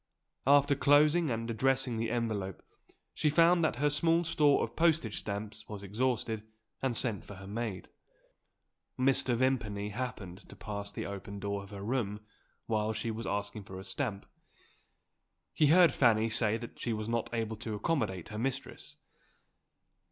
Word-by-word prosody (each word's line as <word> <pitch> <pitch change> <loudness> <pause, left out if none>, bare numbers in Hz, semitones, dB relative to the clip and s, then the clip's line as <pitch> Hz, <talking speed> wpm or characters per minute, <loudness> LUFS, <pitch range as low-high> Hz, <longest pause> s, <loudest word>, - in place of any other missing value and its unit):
After 140 +1 +6
closing 150 +4 +4
and 115 -1 -2
addressing 130 +1 +1
the 115 0 -1
envelope, 110 -5 -2 0.5
she 150 - +1
found 170 +3 +5
that 160 - +2
her 145 +3 +1
small 165 +3 +3
store 150 -3 +3
of 115 - -5
postage 160 -10 +2
stamps 105 +1 -6
was 105 -2 -7
exhausted, 110 +1 -1 0.4
and 130 -4 0
sent 110 -6 -1
for 100 - -10
her 95 0 -10
maid. 105 -2 -4 1.1
Mr. 130 -1 +2
Vimpany 115 -5 0
happened 105 -5 -6
to - - -11
pass 100 -1 -5
the - - -5
open 100 0 -6
door 100 0 -2
of 100 - -11
her 100 -1 -7
room, 105 -3 -2 0.4
while 110 -1 0
she 115 +1 -2
was 115 +1 -5
asking 100 +1 -3
for 95 -1 -9
a - - -8
stamp; 110 -5 -3 1.3
he 150 - +4
heard 175 +3 +7
Fanny 115 -3 +3
say 110 -1 +1
that 120 0 -10
she 120 - -1
was 110 0 -3
not 115 0 -1
able 110 -2 -2
to 110 0 -4
accommodate 105 - -1
her 105 -1 -5
mistress. 135 +3 -4
115 Hz, 160 wpm, -31 LUFS, 105-135 Hz, 1.3 s, heard